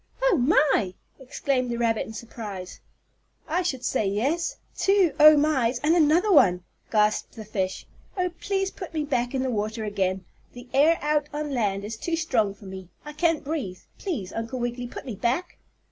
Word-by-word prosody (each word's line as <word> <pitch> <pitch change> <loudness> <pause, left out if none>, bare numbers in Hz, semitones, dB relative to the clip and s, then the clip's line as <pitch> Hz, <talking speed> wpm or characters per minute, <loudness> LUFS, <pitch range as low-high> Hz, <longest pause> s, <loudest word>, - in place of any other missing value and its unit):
"Oh, - - +4
my!" 260 - +3 0.2
exclaimed 265 -1 -1
the 235 - -2
rabbit 230 -2 0
in 220 - -8
surprise. 210 -5 -7 0.7
"I 330 +4 +1
should 265 -8 -2
say 210 - +1
yes! 270 - -1 0.2
Two 390 -6 +3
Oh 305 0 +9
mys 265 -5 +2
and 315 +3 +4
another 340 +5 +4
one!" 180 - +5 0.3
gasped 210 -1 +2
the 220 - -8
fish. 190 -3 -3 0.3
"Oh, 360 -1 0
please 390 -1 -1
put 360 -3 -9
me 310 - 0
back 245 -3 -1
in 260 - 0
the 260 - -1
water 220 +1 -2
again. 190 -3 -1 0.3
The 245 0 -11
air 305 +5 +5
out 295 0 +1
on 295 0 -3
land 200 -5 0
is 220 +1 -5
too 335 +8 -2
strong 230 -11 0
for 200 - -15
me. 190 -2 -9 0.2
I 300 - -7
can't 325 0 +1
breathe. 270 - -4 0.2
Please, 245 - -4
Uncle 225 +3 -4
Wiggily, 240 0 -3
put - - -9
me 250 - -5
back." 255 - -2
255 Hz, 180 wpm, -25 LUFS, 215-310 Hz, 0.7 s, Oh